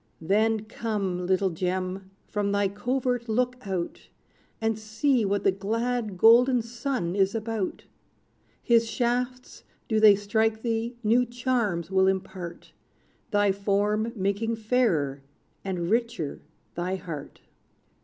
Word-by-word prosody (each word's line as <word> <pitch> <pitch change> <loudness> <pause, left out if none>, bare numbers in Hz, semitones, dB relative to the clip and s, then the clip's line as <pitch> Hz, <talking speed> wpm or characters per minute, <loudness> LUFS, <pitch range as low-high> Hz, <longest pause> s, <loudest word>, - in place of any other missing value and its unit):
Then, 215 +6 +2
come, 200 -5 -3
little 190 0 +2
gem, 185 +2 -3 0.2
from 205 -1 -1
thy 200 -1 +2
covert 245 +3 -1
look 250 +3 +1
out; 180 -3 -4 0.5
And 225 -1 0
see 225 +4 +1
what 200 +1 0
the - - +4
glad, 220 +2 -2
golden 240 +4 +6
sun 230 -6 -3
is 195 +1 +2
about! 220 -3 -3 0.8
His 230 -2 +3
shafts, 250 +3 -2 0.2
do 220 -1 +2
they 215 -2 +8
strike 220 +2 0
thee, 230 0 -1
new 230 +4 +4
charms 235 -8 -1
will 190 0 +4
impart, 190 -2 -4 0.6
Thy 205 -2 +3
form 205 +3 0
making 205 +3 -1
fairer, 215 - +1 0.4
and 180 -3 -2
richer, 230 -10 -1 0.3
thy 180 +2 -2
heart. 165 -6 -8
215 Hz, 120 wpm, -26 LUFS, 190-235 Hz, 0.8 s, they